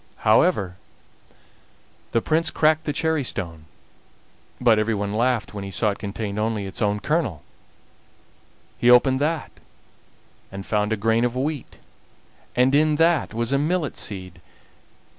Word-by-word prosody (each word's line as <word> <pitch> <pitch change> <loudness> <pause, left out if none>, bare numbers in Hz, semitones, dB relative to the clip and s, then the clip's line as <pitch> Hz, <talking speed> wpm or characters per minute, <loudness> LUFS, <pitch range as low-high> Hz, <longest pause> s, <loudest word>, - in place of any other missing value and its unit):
However, 110 - +3 1.3
the 115 - +1
Prince 160 +1 +1
cracked 155 0 +2
the 150 - 0
cherry 160 0 0
stone, 85 -9 -5 0.9
but 115 -3 +4
everyone 105 -2 -1
laughed 120 0 0
when 100 -1 -5
he 100 - -6
saw 105 +3 +1
it 100 - -8
contained 105 0 -4
only 110 -2 -1
its 95 - -6
own 105 -1 +1
kernel. 140 - -1 1.4
He 120 - +3
opened 130 +2 +5
that 155 +1 -1 1.0
and 95 0 -7
found 105 0 0
a 110 - +1
grain 115 +3 +1
of 120 0 0
wheat, 140 +1 -3 0.8
and 125 +2 +3
in 155 +1 +4
that 165 -6 +2
was 115 +2 -1
a 140 - +2
millet 155 -1 -1
seed. 95 -3 -4
115 Hz, 140 wpm, -23 LUFS, 105-150 Hz, 1.4 s, opened